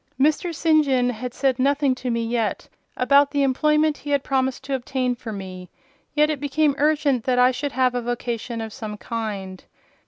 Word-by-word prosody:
Mr. 310 +5 +2
St. 315 -1 +3
John 255 -3 +1
had 250 +2 -5
said 265 0 0
nothing 280 0 +2
to 255 0 -5
me 230 -1 -1
yet 230 -2 -2 0.3
about 280 +3 +4
the 285 -1 +1
employment 300 +3 +2
he 290 - -8
had 285 -1 +1
promised 265 -1 -1
to 275 +1 -4
obtain 255 -1 -1
for 235 -2 -8
me; 185 -3 -8 0.5
yet 300 +1 +4
it 300 - -3
became 290 +1 +1
urgent 290 -4 +2
that 255 -1 +1
I 250 +1 +5
should 275 +2 -4
have 255 -1 +2
a 245 - -1
vocation 240 -1 -3
of 220 -1 -6
some 210 -2 -6
kind. 200 -5 -5
255 Hz, 190 wpm, -23 LUFS, 235-285 Hz, 0.5 s, I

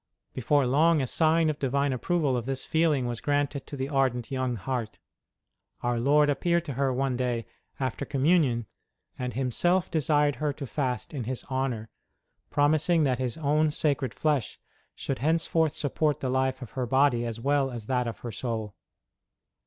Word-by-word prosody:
Before 135 +3 +2
long 155 +5 +4
a 135 - 0
sign 160 +4 +2
of 155 -1 -1
Divine 140 +1 0
approval 145 +1 0
of 120 0 -3
this 135 -1 -3
feeling 160 -5 +2
was 120 -1 -3
granted 145 -1 -1
to 145 - -7
the 135 0 -2
ardent 135 -3 0
young 130 -2 -1
heart. 115 0 -4 0.9
Our 120 -1 0
Lord 145 +4 +4
appeared 170 +4 +1
to 145 - -4
her 135 +1 0
one 130 0 0
day, 120 -2 -1 0.3
after 130 +1 -2
Communion, 140 -4 +2 0.5
and 125 -1 -3
Himself 175 +8 +1
desired 150 -2 +2
her 150 -1 -1
to 140 0 -6
fast 130 0 -3
in 130 -6 -4
His 130 +1 -3
honour, 130 -4 -2 0.6
promising 155 +3 +3
that 130 -3 +1
His 125 0 -2
own 155 0 +2
Sacred 145 -4 0
Flesh 150 -6 -1 0.4
should 135 - -4
henceforth 160 +1 +2
support 150 +1 0
the 130 - -2
life 130 0 0
of 120 - -10
her 130 -2 -3
body 130 -1 +3
as 115 -1 -4
well 140 +2 +1
as 120 -4 -6
that 125 0 0
of 115 - -6
her 120 - -5
soul. 110 -2 -4
135 Hz, 170 wpm, -27 LUFS, 125-150 Hz, 0.9 s, long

